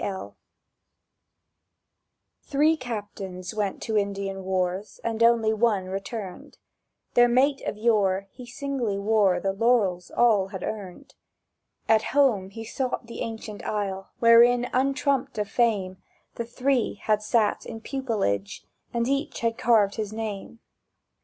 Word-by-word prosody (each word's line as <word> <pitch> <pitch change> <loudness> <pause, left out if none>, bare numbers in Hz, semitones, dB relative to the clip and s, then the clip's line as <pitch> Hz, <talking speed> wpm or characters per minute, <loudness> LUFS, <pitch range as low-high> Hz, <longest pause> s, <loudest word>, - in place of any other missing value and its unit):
L—. 190 -1 -5 2.1
THREE 300 +3 +2
captains 205 - -6
went 205 -3 -2
to 220 - -2
Indian 195 -1 -3
wars, 185 +2 -2
And 230 0 -2
only 230 -2 +4
one 210 -4 +1
returned: 195 0 -6 0.6
Their 240 0 +6
mate 270 +3 +2
of 210 - -3
yore, 205 -4 +2
he 250 -2 -11
singly 250 -5 -2
wore 200 -3 +2
The 195 +1 -1
laurels 200 -5 +1
all 215 -5 +3
had 190 -2 -7
earned. 195 -5 -7 0.7
At 220 -1 +5 0.2
home 225 -10 +3
he 225 +3 -8
sought 255 +1 -3
the 235 - -9
ancient 220 -2 -6
aisle 195 -2 -3
Wherein, 240 +1 +6
untrumped 270 0 0
of 210 -1 -1
fame, 200 -6 +1 0.4
The 235 - -4
three 250 +1 0
had 215 -1 +2
sat 215 0 +1
in 225 - -7
pupilage, 210 - -2 0.3
And 235 0 0
each 275 +2 -2
had 230 -1 0
carved 220 -4 +3
his 215 -2 -3
name. 220 +1 -6
220 Hz, 130 wpm, -26 LUFS, 195-240 Hz, 2.1 s, Their